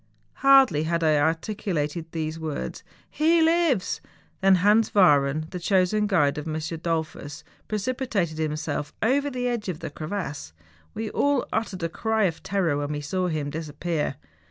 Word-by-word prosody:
Hardly 265 - +5
had 170 +1 0
I 155 -1 +4
articulated 165 -1 -1
those 160 0 -3
words, 155 -3 -4 0.2
' - - -33
He 330 +2 +5
lives! 325 - +2 0.2
' - - -36
than 190 0 +6
Hans 210 +5 +3
Wahren, 150 -5 +4
the 180 - -4
chosen 190 +3 +2
guide 150 -7 +2
of 150 - -7
M. 155 - -3
Dollfus, 160 -2 -4 0.2
precipitated 210 -7 -2
himself 150 -1 -3
over 280 +5 +2
the 250 -2 -2
edge 235 -5 -2
of 165 -3 -4
the 160 - -6
crevasse. 155 - -5 0.4
We 220 -1 -4
all 285 -2 +1
uttered 205 -5 -2
a - - +2
cry 220 +4 0
of 170 -4 0
terror 180 -7 0
when 145 0 -2
we 145 - -3
saw 180 +5 -1
him 150 -4 -2
disappear. 155 -1 -3
170 Hz, 160 wpm, -25 LUFS, 155-215 Hz, 0.4 s, than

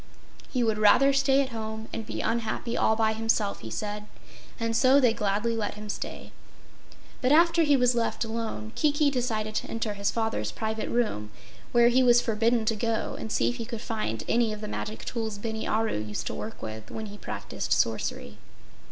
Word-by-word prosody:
He 250 -3 0
would 220 -2 +1
rather 275 +6 +6
stay 275 0 +4
at 260 - -5
home 220 -1 -5
and 225 - -4
be - - -3
unhappy 230 +1 -1
all 220 - +3
by 220 0 +2
himself, 220 -2 0
he 110 - -8
said, 210 - -4 0.5
and 230 0 -1
so 265 +3 +6
they 245 -5 +4
gladly 210 +2 0
let 210 -2 -2
him 210 0 -8
stay. - - -6 0.9
But 255 - +2
after 335 +2 +5
he 290 -3 +4
was 250 -1 +3
left 235 0 0
alone 220 - -4
Kiki 295 -1 +2
decided 225 -4 -1
to - - -2
enter 225 -2 -2
his 200 0 0
father's 225 -1 -1
private 220 0 -3
room, 215 - 0 0.4
where 240 0 +6
he 255 +2 +4
was 240 -1 +6
forbidden 230 0 +1
to 225 - +1
go, 225 +1 -1
and 220 - -5
see - - +2
if 245 - -4
he 230 - -4
could 230 0 -5
find 215 - -3
any 230 -2 +2
of 215 0 -6
the 210 - -4
magic 215 +1 -5
tools 220 -3 -3
Bini 220 +1 -4
Aru 220 - 0
used 105 0 -4
to - - -3
work 225 - -7
with 110 0 -7
when 220 - -5
he 205 0 -9
practiced - - -5
sorcery. 70 - 0
225 Hz, 195 wpm, -27 LUFS, 215-240 Hz, 0.9 s, rather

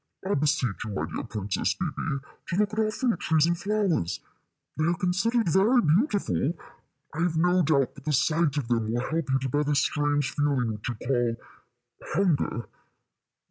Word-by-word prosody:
I 200 - +1
beseech 140 -7 0
you, 105 -3 -5
my 75 - -1
dear 80 -1 -5
Princess 105 -3 -2
Bébè, 150 -5 -3 0.3
to - - -2
look 210 +2 +1
at 220 - -2
our 215 -1 +2
fruit 230 -3 -1
trees 160 -1 +3
and 170 +1 +1
flowers. 190 - 0 0.6
They 155 - 0
are 170 - +2
considered 200 +5 +1
very 200 +9 +4
beautiful. 195 - +1 0.6
I 160 - -5
have 170 -2 +1
no 180 +2 +3
doubt 140 -5 +2
but 140 -2 -14
the 155 - 0
sight 155 +1 +2
of 140 -5 -1
them 115 -2 0
will 120 +3 -1
help 165 -2 -1
you 135 - +4
to 135 0 -3
bear 145 +4 +1
this 145 -1 +2
strange 145 -2 0
feeling 135 -6 0
which 105 +3 -6
you 120 - -3
call 120 0 0 0.8
hunger." 155 - +1
150 Hz, 180 wpm, -27 LUFS, 130-180 Hz, 0.8 s, very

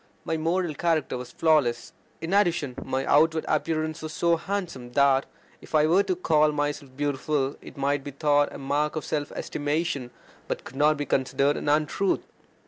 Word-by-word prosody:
My 160 - -1
moral 165 +1 0
character 160 -1 0
was 125 0 -7
flawless. 140 -8 +1 0.3
In 165 +3 -3
addition, 175 -9 +2
my 130 0 -2
outward 160 +2 +3
appearance 155 0 -1
was 155 0 -5
so 170 +1 +2
handsome, 170 -9 -4
that 140 0 +3 0.3
if - - -6
I 150 0 +5
were 175 +5 +4
to 190 -2 -1
call 155 -3 +3
myself 145 -2 -3
beautiful, 145 -1 -1
it - - -12
might 140 0 0
be 145 - -6
thought 145 +1 +2
a - - -8
mark 145 +3 -1
of 155 - -3
self 145 -1 -2
estimation, 145 -3 -2 0.4
but - - -3
could 130 - -11
not 150 +2 +3
be 145 - -2
considered 140 +2 +1
an - - -2
untruth. 155 +6 +1
150 Hz, 175 wpm, -26 LUFS, 140-160 Hz, 0.4 s, I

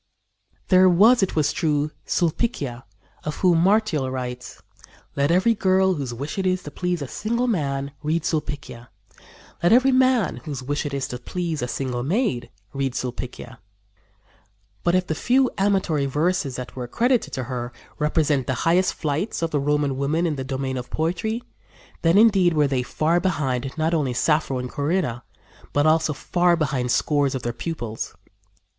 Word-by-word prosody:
There 185 0 +6
was, 215 +8 +6
it 190 -4 0
is 150 -1 +2
true, 150 -1 0 0.2
Sulpicia, 155 - -1 0.4
of 150 -1 -3
whom 175 -3 +3
Martial 185 -7 +2
writes: 125 -1 -6 0.6
"Let 140 +1 +1
every 185 +7 +4
girl, 190 -2 +3
whose 140 -7 -4
wish 140 +10 -5
it 190 - 0
is 185 0 0
to 145 - -8
please 180 -1 -2
a - - -6
single 235 - -1
man, 140 - -1
read 155 +2 0
Sulpicia; 145 -6 -4 0.7
let 175 - +3
every 255 +3 +5
man, 255 -5 +3
whose 140 -5 -6
wish 145 +2 -2
it 140 - -6
is 135 - -2
to 125 - -5
please 165 +2 -3
a 125 - -1
single 125 -2 -3
maid, 150 - -1 0.2
read 135 -2 -1
Sulpicia;" 125 -1 -6 1.2
but, 175 +1 +2
if 185 0 +2
the 160 - -2
few 255 +10 +2
amatory 190 -8 +1
verses 150 -1 0
that 125 -1 -7
are 125 -2 -5
credited 245 - +1
to 130 - -2
her 120 -1 -4 0.3
represent 150 -3 +1
the 130 - 0
highest 180 +3 +3
flights 160 +5 -2
of 165 - -1
the 145 - +1
Roman 145 -1 0
women 150 +5 0
in 160 -3 0
the 135 - -4
domain 130 0 -3
of 125 0 -6
poetry, 220 +9 -2 0.6
then, 165 +3 +4
indeed, 195 -6 +5
were 150 -1 +4
they 135 -2 0
far 155 +7 +1
behind 135 -8 -1
not 160 +1 +1
only 145 -6 0
Sappho 150 -1 +1
and 125 0 -3
Corinna, 145 -3 -1 0.5
but 145 +1 +2
also 155 0 +3
far 175 +4 +1
behind 135 -6 -1
scores 145 -2 +1
of 130 - -4
their 120 - -2
pupils. 120 -5 -5
150 Hz, 170 wpm, -23 LUFS, 135-180 Hz, 1.2 s, There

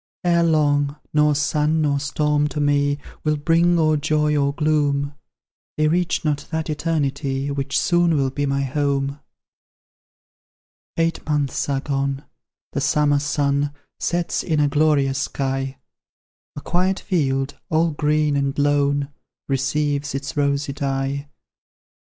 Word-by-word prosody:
Ere 170 -1 +3
long, 145 -3 +2 0.2
nor 150 -1 +4
sun 150 +2 +1
nor 145 -2 +1
storm 150 +1 +1
to 150 - -4
me 145 0 +2 0.3
Will 155 -1 +1
bring 170 +3 +3
or 155 -1 +3
joy 150 0 +1
or 140 -1 +2
gloom; 145 -2 0 0.6
They 155 0 +3
reach 175 0 0
not 145 -2 -1
that 160 -1 -2
Eternity 140 -3 -1
Which 140 0 -2
soon 175 -2 +2
will 135 -2 +1
be 145 +1 -1
my 140 0 0
home." 140 0 -1 1.8
Eight 165 0 0
months 145 -2 0
are 135 -1 0
gone, 140 -1 -2 0.5
the - - -2
summer 145 -1 +2
sun 145 0 0 0.2
Sets 175 0 -1
in 155 -3 0
a 145 - +4
glorious 140 -2 +2
sky; 135 -1 -2 0.8
A 145 - -6
quiet 185 +4 0
field, 135 -7 -1
all 160 +1 +2
green 150 0 +1
and 140 -1 -1
lone, 145 0 +1 0.4
Receives 140 +1 -1
its 140 +2 -4
rosy 140 -1 0
dye. 140 0 -2
145 Hz, 130 wpm, -22 LUFS, 140-155 Hz, 1.8 s, nor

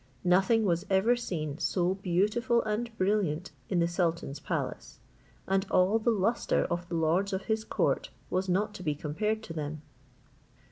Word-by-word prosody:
Nothing 195 +5 +4
was 175 -2 +1
ever 200 +5 +4
seen 160 -10 -4
so 180 0 +1
beautiful 205 +6 +1
and 220 +2 -2
brilliant 185 -4 0 0.2
in 185 - +1
the 170 0 +3
sultan's 170 -5 -1
palace; - - -4 0.5
and 195 0 +2
all 190 +5 +4
the 225 - +1
lustre 225 +1 +1
of 175 +1 -2
the 170 - -2
lords 170 +5 +1
of 190 0 -2
his 220 0 -1
court - - 0 0.2
was 185 +1 0
not 205 +4 +1
to 205 - -9
be 150 -4 -1
compared 210 +10 -2
to 165 - -7
them. 155 -1 -5
190 Hz, 160 wpm, -29 LUFS, 170-215 Hz, 0.5 s, Nothing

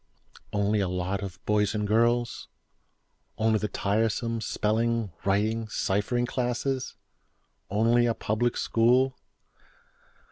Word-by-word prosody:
Only 105 +1 +1
a 95 - +1
lot 90 +2 -2
of 95 -2 -6
boys 105 0 +1
and 105 -1 -1
girls? 115 +2 +1 0.9
Only 110 0 +2
the 105 - -1
tiresome 110 +3 -1
spelling, 115 0 0
writing, 110 +3 +1
ciphering 105 +4 0
classes? 125 +1 -2 0.7
Only 115 +4 +3
a 115 - 0
Public 120 +3 -1
School? 125 +3 +3
110 Hz, 105 wpm, -27 LUFS, 105-120 Hz, 0.9 s, Only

